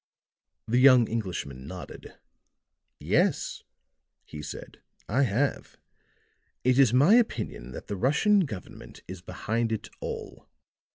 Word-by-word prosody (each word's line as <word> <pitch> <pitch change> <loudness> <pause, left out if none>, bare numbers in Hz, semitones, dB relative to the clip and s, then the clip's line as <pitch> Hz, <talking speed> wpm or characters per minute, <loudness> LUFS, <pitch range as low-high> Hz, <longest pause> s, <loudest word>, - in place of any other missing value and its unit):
The 120 +3 +2
young 130 -3 +7
Englishman 85 - -4
nodded. 90 +2 -9 0.8
"Yes," - - 0 0.6
he 75 - -8
said. 75 - -9 0.3
"I 125 +7 +1
have. 130 +3 -1 0.9
It 130 +1 +3
is 130 -5 +6
my 140 - +5
opinion 225 - +1
that - - -8
the 100 - -4
Russian 150 - +3
government 105 -10 -10
is 95 -1 -8
behind 115 +5 -2
it 110 - -3
all. - - -7
115 Hz, 115 wpm, -27 LUFS, 95-135 Hz, 0.9 s, young